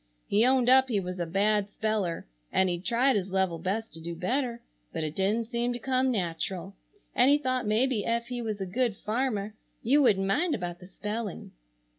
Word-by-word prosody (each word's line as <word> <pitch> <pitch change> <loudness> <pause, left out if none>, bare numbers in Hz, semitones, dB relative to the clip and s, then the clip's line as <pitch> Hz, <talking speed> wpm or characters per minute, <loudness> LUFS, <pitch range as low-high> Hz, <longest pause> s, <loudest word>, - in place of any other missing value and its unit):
He 210 +2 +3
owned 260 -2 +3
up 260 +1 +6
he 215 -4 +1
was 180 -1 -5
a 170 - -1
bad 205 +3 +2
speller 205 -5 -2 0.3
and 190 0 +3
he'd 175 0 -3
tried 245 +4 +2
his 195 -2 -1
level 190 -3 0
best 200 +6 -3
to 165 - -9
do 170 +1 -5
better 235 +6 -1 0.3
but 160 - -3
it 155 0 -4
didn't 210 +4 +1
seem 240 +1 -1
to - - -3
come 260 +1 +1
natural, 190 -2 -3 0.4
and 250 +2 +5
he 290 - +6
thought 255 -5 -1
maybe 225 +1 +2
ef 235 +2 0
he 245 0 -4
was 215 -3 -3
a 190 - -2
good 215 +2 -1
farmer 215 -2 -2 0.3
you 280 +6 +4
wouldn't 200 -7 +3
mind 305 - +1
about 175 -2 -5
the 180 - -12
spelling. 210 +1 -5
215 Hz, 200 wpm, -28 LUFS, 190-245 Hz, 0.4 s, up